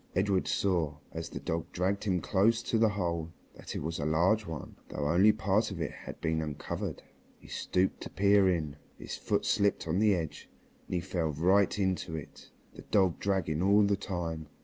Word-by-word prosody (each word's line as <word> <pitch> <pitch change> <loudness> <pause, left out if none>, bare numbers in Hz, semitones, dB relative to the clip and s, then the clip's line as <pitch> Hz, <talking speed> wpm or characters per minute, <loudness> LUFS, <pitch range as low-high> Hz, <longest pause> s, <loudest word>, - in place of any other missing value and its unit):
Edred 95 0 +1
saw, 85 -7 0
as 80 0 -5
the - - -6
dog 80 0 -3
dragged 95 +4 -1
him 90 -4 +1
close 110 +7 +2
to 115 - 0
the 110 -1 +5
hole, 85 -5 -2 0.2
that - - -9
it - - -3
was 80 +2 -3
a - - -2
large 90 +8 +2
one, 80 -2 -7
though 75 - -2
only 95 +7 +6
part 105 +1 +1
of 95 -4 -6
it 80 - -2
had - - -9
been 80 -1 0
uncovered. 75 -2 -4 0.3
He - - -17
stooped 95 +1 -1
to - - -6
peer 100 -1 +4
in, 80 -5 -1 0.2
his - - -6
foot - - -1
slipped 100 -4 +1
on 85 +4 +1
the 105 -2 +4
edge, 80 -4 -5 0.4
and - - -3
he 90 - 0
fell 85 -2 -1
right 95 +7 +3
into 95 -4 -1
it, 75 - -9 0.2
the - - -11
dog 95 -5 +2
dragging 90 -6 0
all 100 +2 +5
the 100 0 +3
time. 85 -5 -4
90 Hz, 195 wpm, -30 LUFS, 80-100 Hz, 0.4 s, only